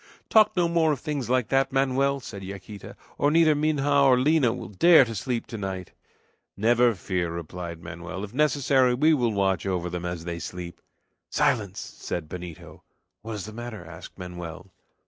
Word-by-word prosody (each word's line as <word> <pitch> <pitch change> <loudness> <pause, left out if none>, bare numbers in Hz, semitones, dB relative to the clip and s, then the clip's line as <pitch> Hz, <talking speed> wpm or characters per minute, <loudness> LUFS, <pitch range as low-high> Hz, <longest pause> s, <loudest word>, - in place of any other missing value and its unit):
"Talk 215 -3 +5
no 175 -1 +3
more 165 -2 +2
of 140 - -5
things 145 -6 -3
like 125 -3 +1
that, 135 0 +2
Manoel," 135 +1 +1
said 100 -4 -8
Yaquita, 100 +1 -9 0.2
"or 145 - +3
neither 160 0 +5
Minha 150 -1 0
nor 140 -3 +5
Lina 140 -2 +3
will 95 - -6
dare 150 - +6
sleep 115 +3 -2
to 115 - -7
night." 95 -2 -5 0.7
"Never 120 +2 +3
fear!" 90 -1 -2
replied 85 0 -6
Manoel; 85 +3 -7
"if 105 +1 -7
necessary 135 -3 +3
we 155 +5 +4
will 120 -6 +1
watch 95 -2 0
over 90 -2 -2
them 90 0 -4
as 90 -2 -4
they 85 -1 -4
sleep." 85 +1 -7 0.5
"Silence!" 100 -4 +1
said 85 -3 -6
Benito. 85 -2 -9 0.4
"What 110 +1 -6
is 105 -3 -5
the 110 - -9
matter?" 115 -5 -7
asked 80 0 -11
Manoel. 90 0 -8
110 Hz, 170 wpm, -26 LUFS, 90-135 Hz, 0.7 s, dare